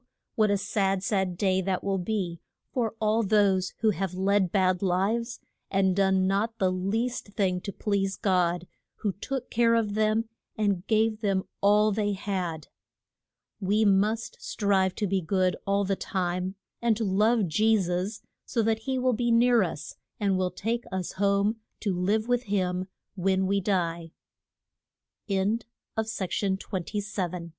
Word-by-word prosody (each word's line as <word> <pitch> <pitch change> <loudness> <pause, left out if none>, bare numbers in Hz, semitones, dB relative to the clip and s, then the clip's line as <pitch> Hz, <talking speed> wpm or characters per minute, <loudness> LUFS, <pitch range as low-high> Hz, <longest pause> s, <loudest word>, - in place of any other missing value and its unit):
what 215 -2 +3
a 200 - +3
sad, 195 -1 0
sad 190 -4 0
day 190 -1 +2
that 185 0 -1
will 195 -1 0
be 180 -3 -2 0.3
for 230 -4 -1
all 220 +1 +2
those 195 -3 +2
who 220 -2 +4
have 190 -2 -3
led 190 -1 +2
bad 185 -2 +2
lives, 205 +6 0 0.3
and 190 -1 +2
done 190 -1 +3
not 205 +4 0
the 190 -3 +2
least 220 +8 -1
thing 185 -3 +1
to 200 - -5
please 195 -1 -1
God, 180 -3 +1 0.4
who 205 -3 0
took 250 +6 -5
care 230 0 +4
of 220 -3 +1
them 215 +1 +1 0.3
and 200 -3 0
gave 220 0 +2
them 195 -3 +1 0.2
all 210 +1 +4
they 205 0 0
had. 185 -6 -3 0.9
We 210 +2 +2
must 210 +3 +1
strive 195 -3 +1
to 210 - -1
be 195 -1 0
good 185 +1 +1
all 200 0 +2
the 195 +1 0
time, 185 0 -2 0.3
and 230 -2 +2
to 225 - -1
love 210 +3 +3
Je 220 +7 +3
sus, 185 +4 -2 0.2
so 230 - 0
that 220 0 +1
he 260 +3 -2
will 255 0 +2
be 240 +1 0
near 235 0 +5
us, 160 -5 -4 0.2
and 200 -2 +2
will 185 -1 +1
take 235 +3 -2
us 185 -2 -3
home 200 +2 +1 0.2
to 200 -4 0
live 205 +5 0
with 245 -4 0 2.8
h 200 +4 0
200 Hz, 145 wpm, -27 LUFS, 190-220 Hz, 2.8 s, near